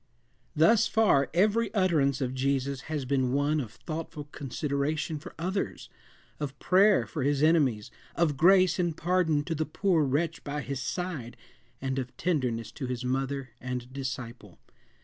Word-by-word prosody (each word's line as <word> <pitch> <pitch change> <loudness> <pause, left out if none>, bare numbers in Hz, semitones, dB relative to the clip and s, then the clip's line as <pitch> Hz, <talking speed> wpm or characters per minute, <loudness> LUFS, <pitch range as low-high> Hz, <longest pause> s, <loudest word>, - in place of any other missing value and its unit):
Thus 170 +9 +5
far, 140 - +3
every 210 +5 +2
utterance 150 -8 +2
of 130 -1 -1
Jesus 135 0 -1
has 150 -4 -2
been 130 -1 +1
one 145 +2 +2
of 115 -6 -5
thoughtful 155 -2 -6
consideration 145 +3 -2
for - - -11
others, 185 +4 -3 0.5
of 140 -2 -4
prayer 195 +5 +4
for 155 - -5
his 140 +2 +1
enemies, 140 -10 +2 0.2
of 165 -4 +2
grace 185 +3 +5
and 170 -3 0
pardon 165 -3 +1
to 165 - -3
the 160 0 -1
poor 165 +1 +1
wretch 145 +4 -1
by 145 +1 -3
his 140 -2 -4
side, 170 -11 -4 0.4
and 135 0 -2
of 125 -1 -6
tenderness 125 -10 -1
to 130 - -5
his 125 -1 -4
mother 135 0 -2
and 125 0 -5
disciple. 125 -7 -6
145 Hz, 150 wpm, -28 LUFS, 130-170 Hz, 0.5 s, Thus